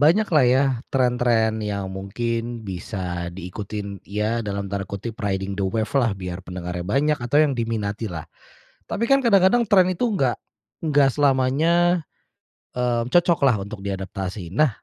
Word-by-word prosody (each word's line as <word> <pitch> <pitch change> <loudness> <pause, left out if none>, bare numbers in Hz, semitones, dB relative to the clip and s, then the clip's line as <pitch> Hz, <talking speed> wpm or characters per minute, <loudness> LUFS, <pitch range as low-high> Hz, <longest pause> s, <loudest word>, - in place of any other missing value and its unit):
banyaklah 165 -2 +4
ya 130 +3 +4 0.3
tren-tren 120 -4 +2
yang 100 -2 -3
mungkin 115 +3 -3
bisa 90 -2 -4
diikutin, 100 +2 -6
ya 105 +3 -1
dalam 100 -1 -3
tanda 100 0 -3
kutip, 100 +4 -6
"riding 95 -1 -1
the 100 - -3
wave-lah," 115 +4 +1
biar 90 0 -6
pendengarnya 90 -1 -5
banyak, 140 +10 +1
atau 130 +5 +2
yang 150 -3 +4
diminatilah. 105 -6 -3 0.6
Tapi 230 - -1
kan 275 +2 +4
kadang-kadang 220 0 +4
tren 190 -3 +6
itu 235 +7 0
enggak, 130 - +1 0.4
enggak 145 -4 +4
selamanya, 150 +6 +3 0.8
mmm, 120 -1 0
cocoklah 155 - +3
untuk 100 -1 -8
diadaptasi. 95 -2 -5
Nah, 155 +4 +4
115 Hz, 135 wpm, -23 LUFS, 100-140 Hz, 0.8 s, tren